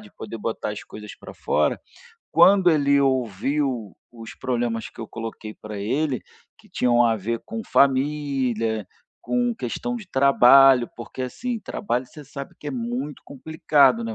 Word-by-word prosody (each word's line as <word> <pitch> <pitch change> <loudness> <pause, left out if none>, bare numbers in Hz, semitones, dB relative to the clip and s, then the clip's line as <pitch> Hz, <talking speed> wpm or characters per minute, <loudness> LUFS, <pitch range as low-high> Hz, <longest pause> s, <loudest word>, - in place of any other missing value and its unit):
de 210 -1 -15
poder 115 - -8
botar 110 0 -3
as 105 - -6
coisas 105 -1 -10
para - - -12
fora, - - 0 0.5
quando 190 -2 +6
ele 140 -2 +3
ouviu 130 -2 -1 0.2
os 115 -1 -10
problemas 120 -3 -2
que - - -13
eu 115 - -7
coloquei 115 -1 -7
para 105 -1 -8
ele, 130 +6 -1 0.4
que 215 - -21
tinham 120 -8 +2
a 115 -1 +2
ver 115 +3 -3
com 225 0 -6
família, 130 -6 +1 0.3
com 245 -1 0
questão 245 +2 -4
de 215 -5 -9
trabalho, 135 -1 +6
porque 120 +2 -7
assim, 230 - -4
trabalho 125 -13 -3
você 150 +4 -12
sabe 140 0 -9
que 150 - -11
é - - -3
muito 125 +3 -4
complicado, 140 -4 +2
né. 115 -1 -4
130 Hz, 155 wpm, -23 LUFS, 115-145 Hz, 0.5 s, quando